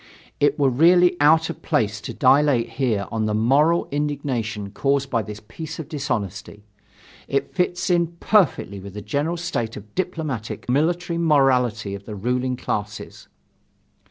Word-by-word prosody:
It 145 - +2
were 140 -3 +3
really 175 +7 +5
out 160 +2 +4
of - - -12
place 105 -1 0
to - - -6
dilate 135 -2 +3
here 115 -7 -1
on 110 -1 -1
the 105 - 0
moral 145 +10 +3
indignation 130 -8 -2
caused 140 +3 0
by 115 - +1
this 105 -1 -8
piece 160 +6 -7
of 160 - -6
dishonesty. 115 - -4 0.6
It 140 - -1
fits 180 -1 0
in 170 -1 +3
perfectly 175 - +2
with 100 +1 -10
the 105 - -6
general 150 +8 -1
state 145 -10 -3
of 105 0 -12
diplomatic 155 - -4
and 125 - +1
military 170 +3 0
morality 125 -9 +2
of 100 0 -8
the 105 - -7
ruling 125 +5 -1
classes. 105 -3 -5
135 Hz, 155 wpm, -22 LUFS, 110-160 Hz, 0.6 s, really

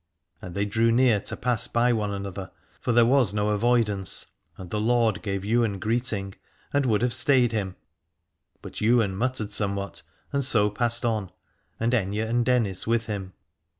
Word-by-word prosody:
And 90 -1 -8
they 100 +1 0
drew 115 +3 +2
near 120 -3 +4
to - - -6
pass 125 -3 0
by 120 +1 +2
one 105 -2 -1
another, 100 -1 -5 0.3
for - - -1
there 120 0 +5
was 120 -5 +3
no 105 0 +1
avoidance: 105 -3 +1 0.3
and 90 -2 -10
the 105 - -1
lord 115 -2 +2
gave 100 -2 -3
Ywain 110 -2 +1
greeting 110 -2 -1 0.4
and 140 -2 +2
would 110 -1 +2
have 125 -1 +1
stayed 130 -4 +3
him, 100 -4 -2 0.9
but - - -8
Ywain 110 -3 +3
muttered 110 -2 -2
somewhat 100 -1 -2 0.3
and 140 0 +1
so 105 -5 +3
passed 120 +2 -1
on, 110 -6 -1 0.5
and 115 +2 0
Aithne 105 -1 0
and 120 +1 +1
Dennis 115 -7 +1
with 115 0 +1
him. 100 -4 -5
110 Hz, 170 wpm, -25 LUFS, 100-120 Hz, 0.9 s, there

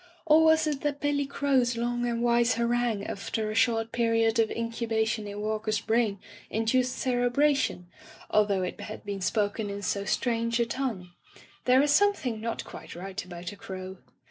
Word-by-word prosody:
Or 315 +1 +6
was 320 0 +5
it 295 -3 -2
that 290 -1 -1
Billy 285 -1 0
Crow's 260 -4 +1
long 240 +1 -1
and 235 0 -1
wise 240 0 +3
harangue 235 -2 0
after 215 +2 -3
a - - -3
short 225 0 +2
period 230 -1 +2
of 220 -1 +3
incubation 225 -2 -1
in 205 0 -6
Walker's 215 0 -1
brain 220 -2 +1 0.3
induced 250 +3 +1
cere 245 -1 +1
bration, 275 -7 +2 0.5
although 205 -3 +3
it 180 - -5
had 215 0 -8
been 200 -1 -4
spoken 205 +2 0
in 200 0 -5
so 200 0 -1
strange 230 +1 0
a 235 - +3
tongue? 230 -8 -3 0.5
There 255 +2 +5
is 290 - +2
something 295 - +2
not 230 0 -3
quite - - -10
right 185 +2 -5
about 175 -1 -7
a - - -10
crow. 190 -1 -7
230 Hz, 170 wpm, -28 LUFS, 210-250 Hz, 0.5 s, Or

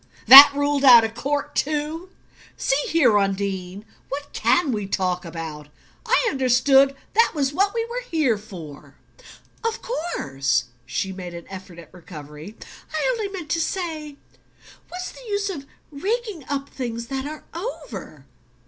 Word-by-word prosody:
"That 280 +2 +12
ruled 285 0 0
out 245 -4 +9
of 225 0 -3
court 285 +4 -3
too? 305 +4 -2 0.5
See 275 +2 0
here. 275 -11 +4
Undine 195 0 -3 0.2
what 285 +1 -6
CAN 350 -6 +2
we 210 -4 -3
talk 180 -2 -1
about? 160 -3 -7 0.4
I - - +3
understood 270 +1 +3 0.2
that 460 +2 +3
was 280 -2 0
what 395 +6 +1
we 455 -1 -1
were 480 +2 -5
here 305 -9 +1
for." 175 -9 -11 0.7
"Of 455 0 -3
course." 140 - -1 0.2
She 190 +9 -3
made 180 -2 -8
an 170 - -9
effort 185 -2 -10
at 170 -2 -14
recovery. 155 +2 -11 0.4
"I 315 +8 -1
only 445 -4 -3
meant 355 -6 -7
to 330 - +1
say 315 -5 -4 0.7
what's 365 +1 -6
the - - -14
use 405 -1 -1
of 280 -6 -8 0.2
raking 400 - -3
up 280 -1 -3
things 235 -3 -5
that 270 +2 -4
are 305 0 -8
over?" 450 +8 -7
275 Hz, 150 wpm, -22 LUFS, -, 0.7 s, That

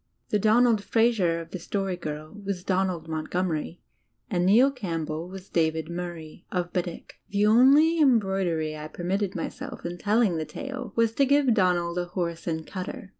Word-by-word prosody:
The 210 - +2
Donald 220 0 +4
Fraser 215 -8 +2
of 165 0 -9
The 185 - -5
Story 195 +1 -2
Girl 155 -2 -6
was 195 -2 -3
Donald 185 -4 -1
Montgomery, 160 +1 -2 0.5
and 175 0 +1
Neil 245 +8 +6
Campbell 165 - -4
was 190 0 -9
David 160 -1 0
Murray, 170 -3 -7
of 180 -1 -2
Bedeque. 175 -2 -4
The 205 +1 +2
only 275 +9 +6
em 270 -6 +6
broidery 180 -6 -1
I 150 0 -6
permitted 190 +5 -2
myself 275 -6 -6
in 170 - -2
the 175 - -8
telling 210 +1 +2
of 165 - -2
the 155 - -3
tale 265 - -6
was 230 -1 +3
to 275 +5 +2
give 280 -3 +4
Donald 180 -4 +1
a 175 - -1
horse 170 -1 -4
and 160 -1 -2
cutter. 190 +1 -6
185 Hz, 175 wpm, -26 LUFS, 170-220 Hz, 0.5 s, Neil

